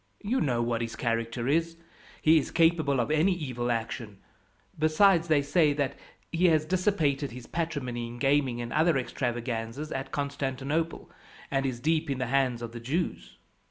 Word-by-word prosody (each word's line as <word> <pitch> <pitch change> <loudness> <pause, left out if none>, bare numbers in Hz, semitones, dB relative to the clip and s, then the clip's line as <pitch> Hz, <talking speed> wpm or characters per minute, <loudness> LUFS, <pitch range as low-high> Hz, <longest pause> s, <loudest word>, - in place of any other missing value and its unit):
You 245 +6 0
know 120 -5 +1
what 115 -1 -1
his 115 0 -4
character 115 0 -2
is. 165 +3 +1 0.5
He 160 +1 +6
is 140 - -4
capable 165 -5 +3
of 120 +5 0
any 160 +5 +3
evil 125 -8 -3
action; 115 -2 -3 0.6
besides, 165 +2 +4
they 150 -3 +3
say 150 0 +3
that 140 -2 -1 0.4
he 170 +2 +2
has 155 -2 +3
dissipated 160 -6 +1
his 120 0 -9
patrimony, 125 -8 -3
in 120 +1 -9
gaming 135 -2 +2
and 120 - -5
other 160 -1 +3
extravagances 120 +2 -3
at 135 0 -4
Constantinople, 140 +3 -2 0.4
and 135 0 +1
is 125 -2 -3
deep 160 +3 0
in 135 - -1
the 130 - -1
hands 130 -3 +1
of 115 - -5
the 120 - -7
Jews. 150 +9 -3
140 Hz, 165 wpm, -28 LUFS, 120-160 Hz, 0.6 s, He